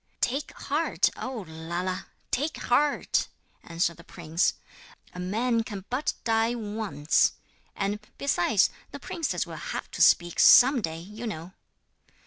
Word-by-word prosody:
'Take 275 +4 -1
heart, 305 +4 +1
O 245 -6 -5
Lala, 170 +3 -4 0.2
take 295 +5 -1
heart!' 285 +4 +1 0.4
answered 170 0 -1
the 170 - -13
prince. 165 0 0 0.6
'A 180 - -8
man 225 +6 0
can 200 -4 -7
but 260 +4 0
die 225 +1 +2
once. 210 -9 +1 0.4
And, 205 +1 -1 0.2
besides, 215 -6 +2 0.2
the 285 - -8
princess 325 +3 -2
will - - -8
have - - -5
to - - -4
speak 175 -1 +4
some 255 0 +8
day, 160 -4 -3
you 210 +7 -8
know.' 170 -2 -6
210 Hz, 130 wpm, -27 LUFS, 175-250 Hz, 0.6 s, some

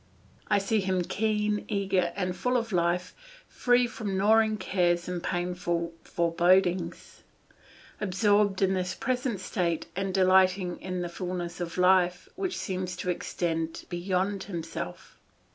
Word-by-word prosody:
I - - +3
see 200 +2 +1
him 190 -2 0
keen, 210 +1 0
eager, 195 -4 +1
and 180 -2 -2
full 250 +8 +1
of 230 -2 -3
life, 180 0 0 0.3
free 245 0 +3
from 205 -5 -4
gnawing 215 +2 +4
cares 175 -2 +1
and 180 -1 -3
painful 175 -1 -2
forebodings, 175 +1 +1 0.8
absorbed 205 0 +2
in 190 0 +3
this 185 0 -2
present 250 -4 -1
state, 170 -3 -1
and 195 0 -1
delighting 185 -1 +3
in 185 -1 -3
a - - -4
fullness 175 -1 -4
of 170 0 -4
life 180 -1 +3
which 380 -1 -2
seems 185 -2 -3
to 180 0 -2
extend 165 -2 -3
beyond 190 +2 -1
himself. 165 - -6
185 Hz, 130 wpm, -28 LUFS, 175-200 Hz, 0.8 s, gnawing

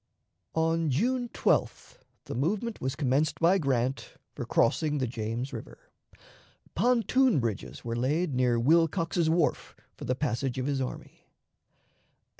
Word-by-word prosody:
On 165 0 +1
June 245 - 0
12th - - -1 0.3
the - - -6
movement 205 - -2
was 130 +1 -2
commenced 145 +1 0
by 175 +4 +4
Grant 130 -2 -1 0.2
for - - -5
crossing 150 +5 +1
the 130 - 0
James 115 +2 -4
River. - - -10 0.8
Pontoon 250 - +3
bridges 115 -2 -4
were 115 0 -2
laid 145 +7 0
near 125 -2 +2
Wilcox's 165 +4 +2
Wharf 165 -1 0 0.2
for - - -8
the 125 - 0
passage 130 -2 -2
of 130 - -2
his 140 -1 -1
army. 130 - -7
145 Hz, 130 wpm, -28 LUFS, 125-170 Hz, 0.8 s, by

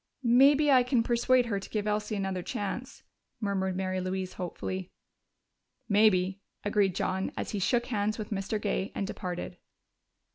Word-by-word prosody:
"Maybe 275 +5 +5
I 260 -2 +7
can 245 -1 +2
persuade 245 +1 +3
her 205 -4 -1
to 195 - -10
give 210 -2 -2
Elsie 210 0 -1
another 190 -2 -2
chance," 205 +8 -5 0.4
murmured 190 -3 -1
Mary 185 0 -1
Louise 185 0 -3
hopefully. 185 +1 -5 1.0
"Maybe," 200 -3 +3 0.2
agreed 205 -3 +2
John 190 +1 -1
as - - -3
he 205 - -2
shook 240 +5 +1
hands 215 -3 -1
with 215 -1 -6
Mr. 200 +1 -2
Gay 200 -2 -1
and 195 - -1
departed. 180 -2 -5
205 Hz, 150 wpm, -29 LUFS, 190-235 Hz, 1.0 s, I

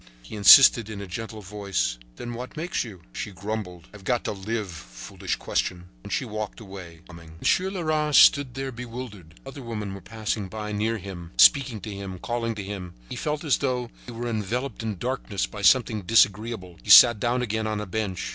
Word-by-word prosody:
He - - -10
insisted 110 +1 +8
in 105 -2 -6
a 100 - -6
gentle 110 +3 -7
voice: 95 -11 -2 0.2
"Then 120 0 -7
what 125 +5 -8
makes 175 +4 -2
you?" 100 -8 -11
She - - -5
grumbled: 95 -3 -6
"I've 105 -2 -13
got 120 +4 0
to - - -2
live! 105 0 -4
Foolish - - -6
question!" 90 0 -3
And - - -9
she - - -1
walked 105 0 -5
away, 95 -6 -11
humming. 85 -2 -13
Monsieur 185 - +1
Leras 155 -5 -1
stood 140 -4 +6
there 135 0 -4
bewildered. 115 -8 -9
Other 135 +1 -9
women 105 -5 -5
were 100 - -9
passing 110 -3 -4 0.3
near 110 +2 0
him, 90 -3 -9
speaking 130 -8 +5
to 105 +2 -6
him 100 -1 -6
and 90 - -11
calling 115 -1 -2
to 105 - -5
him. 95 -3 -7
He - - -6
felt 150 +1 -3
as 150 -4 +2
though 125 -3 -2 0.2
he - - -7
were 120 +1 -5
enveloped 115 +3 -3
in 110 -3 -4
darkness 120 -2 -2
by 105 - -9
something 110 0 +4
disagreeable. 105 -2 +1
He - - -12
sat 105 +2 +9
down 120 +3 0
again 110 -1 -2
on 110 -1 -2
a 105 - -4
bench. 95 -1 -3
110 Hz, 195 wpm, -25 LUFS, 95-120 Hz, 0.3 s, sat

